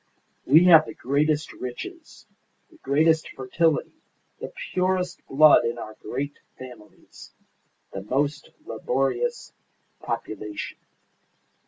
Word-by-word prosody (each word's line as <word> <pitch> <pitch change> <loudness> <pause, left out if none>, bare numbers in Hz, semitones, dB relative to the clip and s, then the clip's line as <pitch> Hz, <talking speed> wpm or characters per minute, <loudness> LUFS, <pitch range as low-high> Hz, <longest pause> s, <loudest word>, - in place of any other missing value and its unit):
We 155 +6 +7
have 160 -3 +7
the - - -8
greatest 150 +3 0
riches, 315 - -9 0.5
the 330 - -19
greatest 160 - +2
fertility, 145 +4 -1 0.4
the - - -7 0.2
purest 185 -1 0
blood 150 0 +6
in 120 +1 -2
our 110 -2 -8
great 140 +3 -5 0.2
families, 125 -5 -13 0.6
the 95 - -5
most 140 +7 -2 0.2
laborious 135 - -2 0.5
population. 105 -1 -5
145 Hz, 100 wpm, -25 LUFS, 125-165 Hz, 0.6 s, We